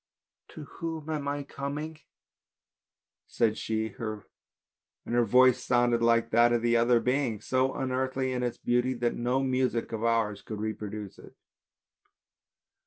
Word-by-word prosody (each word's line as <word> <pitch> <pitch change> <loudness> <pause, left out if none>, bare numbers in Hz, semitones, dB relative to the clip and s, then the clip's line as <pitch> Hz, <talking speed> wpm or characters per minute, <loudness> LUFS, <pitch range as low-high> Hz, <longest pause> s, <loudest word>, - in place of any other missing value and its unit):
" - - -64
To 155 - -7
whom 160 +1 -6
am 150 -2 -3
I 145 0 -2
coming? 145 +3 -5 0.6
" - - -64
said 110 -2 +1
she, 110 0 -2
and 110 -2 -3 0.9
her 120 0 +2
voice 125 +2 +5
sounded 120 -1 +2
like 115 0 +3
that 120 +1 +5
of 120 -1 +1
the 120 0 +3
other 120 +1 +4
beings, 125 -4 -1
so 130 +1 +1
unearthly 130 0 -1
in 125 - -2
its 120 -1 -2
beauty 125 +1 0
that 120 0 0
no 125 +3 0
music 130 -3 0
of 110 -1 -4
ours 115 -3 +1
could 110 -2 -7
reproduce 105 -2 -5
it. - - -15
120 Hz, 150 wpm, -28 LUFS, 115-130 Hz, 0.9 s, voice